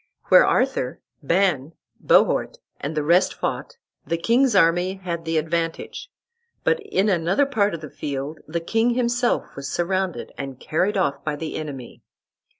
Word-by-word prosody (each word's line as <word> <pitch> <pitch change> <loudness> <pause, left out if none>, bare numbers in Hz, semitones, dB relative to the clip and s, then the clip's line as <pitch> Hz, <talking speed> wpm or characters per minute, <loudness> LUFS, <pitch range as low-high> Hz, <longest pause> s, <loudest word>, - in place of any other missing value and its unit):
Where - - +7
Arthur, 250 - 0 0.2
Ban, 165 -2 +1 0.3
Bohort, - - +3 0.2
and 155 +2 -4
the 150 - +1
rest 170 +5 +3
fought - - -4 0.3
the 170 - -2
king's 235 +6 +2
army 175 +1 +3
had 170 -3 -5
the 165 0 0
advantage; 165 +1 -2 0.5
but 475 - +2
in 410 - 0
another 185 +8 +2
part 210 -9 +1
of 160 - -9
the 155 - -8
field 140 +1 -5
the 170 +2 -3
king 225 +7 +1
himself 245 0 0
was 140 0 -6
surrounded 185 0 -1
and 135 -2 -6
carried 195 +6 0
off 140 -7 0
by 150 -1 -2
the 155 +1 -5
enemy. 140 -5 -7
170 Hz, 150 wpm, -23 LUFS, 155-205 Hz, 0.5 s, Where